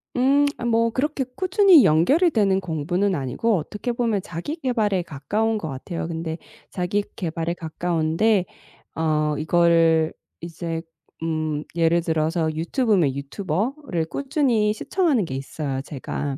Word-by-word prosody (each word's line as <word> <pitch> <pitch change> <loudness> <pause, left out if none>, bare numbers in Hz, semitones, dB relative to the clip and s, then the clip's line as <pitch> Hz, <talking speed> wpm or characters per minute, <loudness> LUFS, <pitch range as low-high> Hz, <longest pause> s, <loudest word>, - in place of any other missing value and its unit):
음 275 +3 +4
아 - - -5
뭐 230 0 +2
그렇게 270 +2 -1
꾸준히 375 - +6
연결이 270 - +4
되는 200 -7 +2
공부는 180 +3 -1
아니고 160 - 0
어떻게 210 +9 -4
보면 230 -4 0
자기 180 - -5
계발에 220 - 0
가까운 200 +9 -1
것 160 -7 -5
같아요. 160 +5 -5
근데 165 -1 -4 0.3
자기 190 +2 -1
계발에 165 -1 -2
가까운데 170 +4 0 0.5
어 155 -2 +1
이거를 165 0 +3 0.3
이제 165 -1 -5 0.4
음 155 -2 -2
예를 170 0 +3
들어서 160 0 0
유튜브면 170 - +1
유튜버를 185 - -2
꾸준히 255 - +1
시청하는 290 - +1
게 135 - -6
있어요 135 0 -4
제가. 140 0 -5
175 Hz, 295 characters per minute, -23 LUFS, 160-225 Hz, 0.5 s, 꾸준히